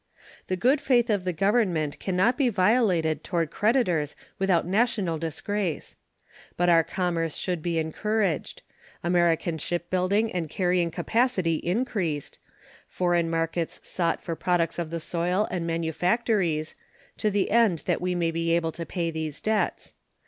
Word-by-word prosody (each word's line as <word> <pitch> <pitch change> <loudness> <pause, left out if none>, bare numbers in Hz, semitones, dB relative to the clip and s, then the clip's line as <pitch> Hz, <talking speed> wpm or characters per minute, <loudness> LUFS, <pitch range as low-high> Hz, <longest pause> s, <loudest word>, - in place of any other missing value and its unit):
The 185 - 0
good 260 +10 +2
faith 245 -4 +3
of 200 -3 0
the 180 - +1
Government 185 -5 +1
can 190 - -2
not 195 +7 +3
be 270 -3 +2
violated 185 -6 +2
toward 170 -4 -1
creditors 185 - +1 0.2
without 190 -4 +2
national 195 -4 +1
disgrace. 165 +1 -3 0.6
But 175 0 +2
our 165 -1 +6
commerce 165 -3 -2
should 180 -3 -2
be 170 0 -1
encouraged; 185 +2 -1 0.4
American 170 -2 +1
shipbuilding 185 +6 0
and 170 -4 -2
carrying 180 -1 +1
capacity 195 -4 +1
increased; 175 - -2 0.5
foreign 175 -2 +1
markets 165 0 -2
sought 170 -2 -1
for 165 - -3
products 175 -1 0
of 170 -2 -3
the 165 +1 -3
soil 175 +5 0
and 175 -2 -2
manufactories, 170 0 0 0.4
to 215 - +1
the 200 -1 0
end 215 -7 +3
that 175 - 0
we 180 0 -1
may 170 -1 +1
be 165 0 +1
able 165 -1 0
to 165 +1 -7
pay 170 -3 -2
these 160 -2 -4
debts. 215 -1 -1
175 Hz, 145 wpm, -26 LUFS, 165-205 Hz, 0.6 s, our